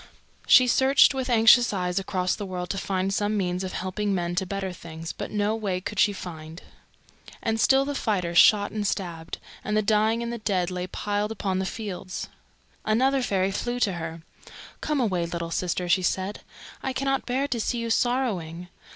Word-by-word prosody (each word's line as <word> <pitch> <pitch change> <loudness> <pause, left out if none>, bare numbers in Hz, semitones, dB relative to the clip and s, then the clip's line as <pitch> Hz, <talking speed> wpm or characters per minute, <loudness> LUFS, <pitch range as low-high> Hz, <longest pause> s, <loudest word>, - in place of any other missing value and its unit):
She 255 - +8
searched 265 +3 +5
with 260 -1 -3
anxious 235 +1 +6
eyes 180 -2 -1
across 185 -1 -1
the 210 - -5
world 180 -1 -4
to 195 - -2
find 190 0 -1
some 210 +1 0
means 180 -1 -1
of 185 - -5
helping 195 +2 -2
men 175 -1 -2
to 190 +1 -1
better 195 -1 -3
things, 165 -1 -8
but - - -6
no 210 +1 0
way 200 -5 -2
could 190 +2 -5
she 205 - +5
find. 165 -3 -8 0.8
And 225 0 0
still 270 +3 +4
the 285 - -2
fighters 180 -10 +1
shot 205 -1 +5
and 210 -2 -2
stabbed, 170 -5 -4 0.3
and 210 +1 -1
the 215 - +2
dying 220 +2 +2
and 235 0 -3
the 235 - -5
dead 185 -4 0
lay 180 0 -3
piled 205 +3 -2
upon 195 -4 -2
the 190 - -1
fields. 190 -4 -5 0.5
Another 260 +5 +2
fairy 195 -5 0
flew 240 +5 -2
to 200 - +2
her. 165 -1 -6 0.6
"Come 300 -2 0
away, 185 -8 0
little 170 -1 -4
sister!" 180 +1 -1
she 185 +2 +3
said. 190 +3 -2 0.4
"I 265 - -2
cannot 270 0 -1
bear 265 +3 0
to 240 - -1
see 240 - -1
you 230 -1 -2
sorrowing. 195 -10 -1
200 Hz, 190 wpm, -26 LUFS, 180-225 Hz, 0.8 s, She